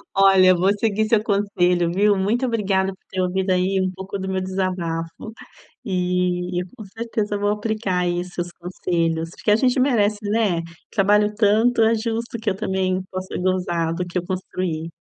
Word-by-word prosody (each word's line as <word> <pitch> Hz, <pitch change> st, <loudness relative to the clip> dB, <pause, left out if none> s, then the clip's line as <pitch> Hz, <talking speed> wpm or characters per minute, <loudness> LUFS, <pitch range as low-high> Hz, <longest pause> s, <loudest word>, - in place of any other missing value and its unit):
Olha, 195 Hz, -1 st, +6 dB
eu 185 Hz, -1 st, +6 dB
vou 190 Hz, +3 st, +3 dB
seguir 220 Hz, 0 st, +1 dB
seu 215 Hz, -1 st, +3 dB
conselho, 180 Hz, -5 st, +1 dB
viu. 205 Hz, +1 st, +3 dB
Muito 225 Hz, +7 st, +1 dB
obrigada 195 Hz, -5 st, 0 dB
por -, -, -25 dB
ter 185 Hz, -1 st, -2 dB
ouvido 185 Hz, +1 st, 0 dB
aí 185 Hz, +1 st, +1 dB
um 185 Hz, -, 0 dB
pouco 190 Hz, +1 st, -6 dB
do 190 Hz, -, -4 dB
meu 190 Hz, 0 st, -1 dB
desabafo. 185 Hz, 0 st, -3 dB, 0.5 s
E 180 Hz, -2 st, 0 dB
e -, -, -3 dB
com 215 Hz, -, -9 dB
certeza 215 Hz, 0 st, -3 dB
vou 205 Hz, 0 st, +1 dB
aplicar 210 Hz, -3 st, -1 dB
aí 175 Hz, 0 st, 0 dB
seus 175 Hz, -1 st, -5 dB
conselhos, 170 Hz, -2 st, -2 dB
porque 210 Hz, -, -2 dB
a 210 Hz, -, +6 dB
gente 250 Hz, +2 st, +2 dB
merece, 215 Hz, -6 st, +2 dB
né? 205 Hz, -6 st, +1 dB, 0.3 s
Trabalho 210 Hz, +1 st, +3 dB
tanto, 225 Hz, +3 st, +3 dB
é 225 Hz, +1 st, +4 dB
justo 230 Hz, +1 st, -3 dB
que 220 Hz, -, 0 dB
eu 190 Hz, -, -2 dB
também 190 Hz, -2 st, -1 dB
possa 185 Hz, 0 st, -5 dB
gozar 175 Hz, -3 st, 0 dB
do 180 Hz, +1 st, -3 dB
que 175 Hz, +1 st, -3 dB
eu 175 Hz, -, -3 dB
construí. 180 Hz, -3 st, -3 dB
190 Hz, 180 wpm, -22 LUFS, 180-210 Hz, 0.5 s, Olha